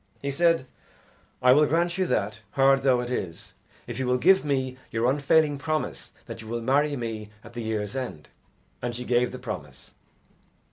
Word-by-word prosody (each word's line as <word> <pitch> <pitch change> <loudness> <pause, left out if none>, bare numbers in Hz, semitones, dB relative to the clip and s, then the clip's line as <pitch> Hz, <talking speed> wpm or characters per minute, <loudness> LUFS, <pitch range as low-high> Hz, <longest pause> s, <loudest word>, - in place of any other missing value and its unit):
He 140 - -3
said, 165 0 +2 0.8
"I 125 - +7
will 150 +3 +6
grant 170 +3 +1
you 190 -1 0
that, 105 -4 -1
hard 135 0 +4
though 130 -2 +3
it 125 0 -5
is, 90 -9 -4 0.3
if - - -6
you 130 - -1
will 125 0 +3
give 190 +8 +5
me 130 -3 -1
your 115 +1 0
unfailing 145 +2 +3
promise 155 +1 -3 0.2
that - - -8
you 110 - -11
will 120 +1 -2
marry 145 +4 +2
me 110 -4 -5
at 115 - -13
the 120 - -5
year's 110 -1 -3
end." 125 - -5 0.5
And 120 -1 -3
she 125 +1 -5
gave 125 0 +2
the 130 - -6
promise. 90 - -8
130 Hz, 185 wpm, -26 LUFS, 115-145 Hz, 0.8 s, I